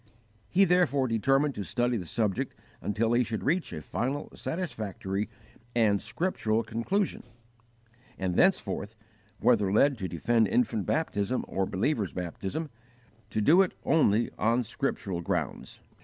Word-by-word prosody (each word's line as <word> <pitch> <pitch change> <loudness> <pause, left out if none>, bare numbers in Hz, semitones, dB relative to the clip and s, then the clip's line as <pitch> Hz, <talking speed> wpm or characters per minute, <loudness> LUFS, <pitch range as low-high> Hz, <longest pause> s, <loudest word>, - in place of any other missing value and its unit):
He 195 - +5
therefore 170 -7 +3
determined 135 +5 +2
to 105 - -4
study 120 +5 0
the 90 -7 -4
subject 105 +1 -1 0.3
until 110 +3 0
he 120 +1 +4
should 110 -2 -4
reach 170 +5 0
a 75 - -6
final, 135 - -3
satisfactory, 105 - -3 0.5
and 105 -4 +3
scriptural 110 - -1
conclusion; 175 - -1 1.0
and 95 -1 -1
thenceforth, 110 - +1 0.4
whether 105 -6 +3
led 135 +4 +4
to 95 - -2
defend 110 +6 +2
infant 110 0 +1
baptism 125 -6 0
or 95 0 -1
believers' 105 - 0
baptism, 95 - -4 0.6
to 110 - -1
do 165 - +6
it 190 - 0
only 120 -8 +3
on 115 +3 +2
scriptural 95 -4 -3
grounds. - - -3
115 Hz, 130 wpm, -29 LUFS, 100-140 Hz, 1.0 s, do